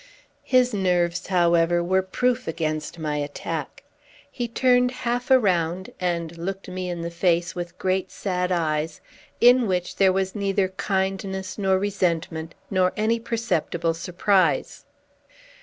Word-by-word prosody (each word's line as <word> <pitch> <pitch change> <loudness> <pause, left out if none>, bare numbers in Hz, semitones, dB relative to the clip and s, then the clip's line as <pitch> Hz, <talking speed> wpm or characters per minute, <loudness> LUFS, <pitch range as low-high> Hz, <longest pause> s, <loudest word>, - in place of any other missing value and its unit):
His 250 -2 +3
nerves, 180 -3 +1
however, 170 -1 +3
were 190 +2 +2
proof 250 +6 -1
against 155 0 -3
my 155 -2 -2
attack. 145 0 -5 0.5
He 240 -2 -3
turned 250 +1 +3
half 245 0 -3
around, 185 -7 +2
and 170 -2 -2
looked 195 +3 -4
me 185 0 -4
in 175 -1 -4
the 170 - -4
face 170 0 +1
with 175 0 -6
great 185 0 0
sad 180 -2 -2
eyes, 155 -2 -1 0.4
in 245 0 +6
which 180 -2 -2
there 195 -1 +5
was 190 0 -1
neither 195 -2 0
kindness 190 0 -2
nor 190 -1 +3
resentment, 170 -4 -1 0.2
nor 185 -1 +2
any 225 +2 +1
perceptible 175 -8 -1
surprise. 185 +3 +1
185 Hz, 130 wpm, -24 LUFS, 170-200 Hz, 0.5 s, in